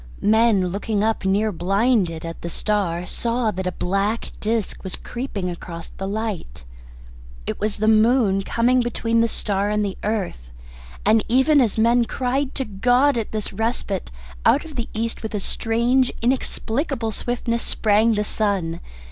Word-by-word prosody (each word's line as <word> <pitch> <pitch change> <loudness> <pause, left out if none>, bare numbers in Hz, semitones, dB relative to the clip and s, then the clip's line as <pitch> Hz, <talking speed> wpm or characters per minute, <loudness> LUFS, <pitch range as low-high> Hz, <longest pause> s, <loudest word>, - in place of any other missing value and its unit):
Men 215 -3 +4
looking 205 +2 -1
up, 220 -3 0
near 205 +3 +2
blinded, 190 -2 +1
at 165 0 -7
the 170 - -4
star, 180 -3 -1
saw 235 +2 -1
that 190 -1 -4
a - - 0
black 195 +5 -1
disc 220 -1 -2
was 190 - -4
creeping 240 -7 -5
across 170 -1 -7
the 195 - -6
light. 200 - -4 0.8
It - - -4
was 210 0 -1
the 215 - 0
moon, 220 -2 +4
coming 245 +5 +2
between 230 -1 +1
the 230 - +3
star 205 -2 -1
and 210 0 +1
the 195 - -5
earth. 195 - -3 0.6
And 220 0 +4
even 265 +5 +4
as 225 -4 +1
men 235 +2 +4
cried 260 +4 -1
to 265 - -1
God 245 +7 +3
at 230 -3 -2
this 215 -1 -4
respite, 225 -4 -2 0.3
out 295 - +4
of 310 -2 -10
the 235 -2 -3
East 230 +1 -2
with 220 -1 -4
a - - 0
strange 240 +5 +1
inexplicable 245 0 -1
swiftness 235 +1 -2
sprang 220 +1 +2
the 210 - +1
sun. 195 -6 -1
220 Hz, 160 wpm, -22 LUFS, 195-235 Hz, 0.8 s, Men